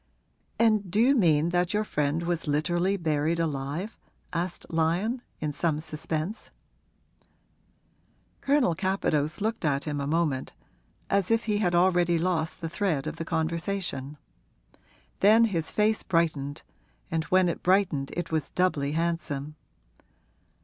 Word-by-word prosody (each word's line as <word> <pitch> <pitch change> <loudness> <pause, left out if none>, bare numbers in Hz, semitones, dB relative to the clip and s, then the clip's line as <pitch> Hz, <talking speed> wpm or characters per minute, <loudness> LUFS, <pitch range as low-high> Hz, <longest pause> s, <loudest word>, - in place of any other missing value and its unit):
'And 215 -4 +3
do 200 +5 0
you 255 +5 +5
mean 165 - +3
that 175 +2 0
your 210 - +2
friend 150 -3 -1
was 170 -2 -2
literally 175 +6 +1
buried 160 -1 0
alive?' 155 +6 -3 0.3
asked 175 +1 -3
Lyon, 175 +10 0 0.2
in 150 -1 -2
some 150 +1 0
suspense. 155 +5 -4 1.9
Colonel 275 - +3
Capadose 165 -3 -1
looked 220 +2 -1
at 140 -2 +1
him 145 -2 -3
a 140 - -2
moment, 150 -4 0 0.6
as 195 -2 +2
if 225 0 +2
he 210 -2 +1
had 175 -4 +1
already 175 -1 +3
lost 165 -2 -1
the 165 - -2
thread 165 -4 -1
of 155 - -5
the 165 - -4
conversation. 165 -3 -2 1.0
Then 215 +4 +6
his 170 -8 0
face 215 0 +1
brightened 155 -5 -1 0.5
and 160 -1 0
when 185 +1 +3
it 170 - -2
brightened 180 -7 +2
it 175 -1 -3
was 155 -3 -1
doubly 150 -6 0
handsome. 155 -3 -2
170 Hz, 135 wpm, -27 LUFS, 155-190 Hz, 1.9 s, Then